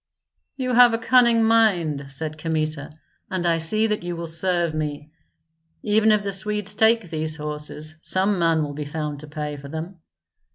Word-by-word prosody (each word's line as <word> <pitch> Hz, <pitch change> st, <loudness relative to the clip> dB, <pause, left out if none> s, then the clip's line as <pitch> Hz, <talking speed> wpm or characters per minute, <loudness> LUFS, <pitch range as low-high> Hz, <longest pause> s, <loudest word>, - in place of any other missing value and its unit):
"You 255 Hz, -2 st, -2 dB
have 240 Hz, -1 st, +6 dB
a -, -, -1 dB
cunning 235 Hz, -1 st, +4 dB
mind," 185 Hz, -11 st, +2 dB
said 155 Hz, +3 st, -2 dB
Kmita, 155 Hz, -2 st, -2 dB, 0.4 s
"and 185 Hz, -2 st, -3 dB
I 165 Hz, -1 st, +2 dB
see 215 Hz, +8 st, +2 dB
that 210 Hz, -1 st, -1 dB
you 175 Hz, 0 st, -5 dB
will 170 Hz, 0 st, -5 dB
serve 170 Hz, 0 st, +1 dB
me. 150 Hz, -1 st, -5 dB, 0.7 s
Even 215 Hz, +1 st, +3 dB
if 210 Hz, -1 st, +2 dB
the 200 Hz, -1 st, -3 dB
Swedes 210 Hz, +1 st, -2 dB
take 220 Hz, -3 st, +2 dB
these 155 Hz, -1 st, -3 dB
horses, 150 Hz, 0 st, -4 dB
some 190 Hz, +2 st, +2 dB
man 165 Hz, -2 st, +2 dB
will 145 Hz, -1 st, -5 dB
be 150 Hz, +1 st, -5 dB
found 150 Hz, -1 st, -5 dB
to 150 Hz, -, -10 dB
pay 150 Hz, -1 st, -5 dB
for 140 Hz, 0 st, -10 dB
them." 165 Hz, +5 st, -7 dB
165 Hz, 175 wpm, -23 LUFS, 155-210 Hz, 0.7 s, have